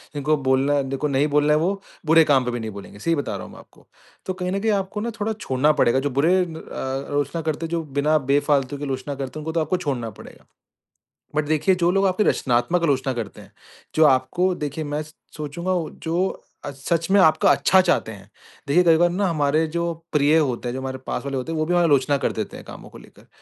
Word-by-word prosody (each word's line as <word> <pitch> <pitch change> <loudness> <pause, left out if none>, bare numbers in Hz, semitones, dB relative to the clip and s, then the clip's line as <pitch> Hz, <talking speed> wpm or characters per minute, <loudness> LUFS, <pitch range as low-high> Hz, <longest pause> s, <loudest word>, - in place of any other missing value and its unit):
जिनको 150 +2 +1
बोलना 135 +2 +3
जिनको 135 +2 -2
नहीं 140 +1 +1
बोलना 150 0 +4
है 150 - +3
वो 195 +4 -1 0.3
बुरे 165 +1 +7
काम 135 -4 +3
पे 125 - -1
भी 120 - -3
नहीं 110 - -5
बोलेंगे। 100 0 -11
सही 165 +8 +1
बता 140 -8 -3
रहा - - -8
हूँ - - -12
मैं - - -12
आपको। - - -20 0.4
तो 185 - -2
कहीं 180 -1 -3
न 195 - -1
कहीं 220 +2 +1
आपको 200 +1 -2
ना 235 - -2
थोड़ा 215 +1 -1
छोड़ना 150 -8 +1
पड़ेगा, 120 +3 +3
जो 145 - -1
बुरे 145 +7 +2
अ - - +3
अ, 135 -5 -5
आलोचना 145 +3 -1
करते 160 0 -2
हैं, - - -6
जो 170 -1 -1 0.2
बिना 155 +2 +3
बेफालतू 145 -1 +1
के 145 - -8
आलोचना 135 +1 -4
करते 135 +2 -6
हैं 150 - -8
उनको 160 - -2
तो 165 - +1
आपको 155 +4 0
छोड़ना 135 -9 -3
पड़ेगा। - - -14 0.9
बट 155 0 +1
देखिए 155 +5 +2
जो 175 -1 +2
लोग 195 +1 +2
आपकी 185 +3 +1
रचनात्मक 135 +4 +1
आलोचना 135 -4 +1
करते 115 -5 -6
हैं, - - -17 0.4
जो 155 - +5
आपको 145 +7 +2
देखिए 150 0 -4
मैं 145 0 -3
स 155 0 -16 0.2
सोचूँगा 160 +5 -3 0.3
जो 175 +4 -1 0.3
सच 165 +5 -2
में 200 - +6
आपका 185 +3 +4
अच्छा 190 - +4
चाहते 175 -11 0
हैं। 100 -1 -13 0.4
देखिए 165 +6 +4
कई 165 -2 +5
बार 175 +1 +4
ना 190 +3 0
हमारे 155 -1 +1
जो 170 0 -1 0.2
प्रिय 150 +1 +4
होते 130 -5 0
हैं, - - -4
जो 130 - -4
हमारे 130 0 -4
पास - - -3
वाले 140 -1 -2
होते 130 +5 -4
हैं 160 - -2
वो 155 - +1
भी 175 - -1
हमारी 175 -1 +4
आलोचना 140 0 +3
कर - - -1
देते - - -5
हैं - - -12
कामों - - -11
को - - -13
लेकर। - - -18
150 Hz, 240 wpm, -22 LUFS, 135-170 Hz, 0.9 s, बुरे